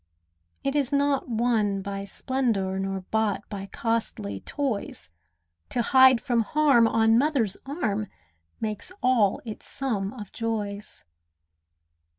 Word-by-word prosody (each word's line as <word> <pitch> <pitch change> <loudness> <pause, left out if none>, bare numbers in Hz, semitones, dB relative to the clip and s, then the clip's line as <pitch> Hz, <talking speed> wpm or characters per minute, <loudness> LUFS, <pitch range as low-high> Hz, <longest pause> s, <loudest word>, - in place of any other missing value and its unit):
It 275 +1 -1
is 280 -2 +1
not 280 -2 +1
won 220 -4 +1
by 200 0 -4
splendour, 200 -4 -1
Nor 195 0 -2
bought 220 -2 0
by 195 -2 -6
costly 205 - -1
toys; 255 - -3 0.6
To 240 - 0
hide 260 0 +6
from 240 -2 +1
harm 275 -1 +4
on 225 0 +4
mother's 260 -9 +1
arm 215 - -1 0.5
Makes 215 - -4
all 240 -6 +3
its 215 -2 -8
sum 215 -8 -2
of 210 -6 -9
joys. 210 -3 -3
225 Hz, 120 wpm, -26 LUFS, 200-260 Hz, 0.6 s, hide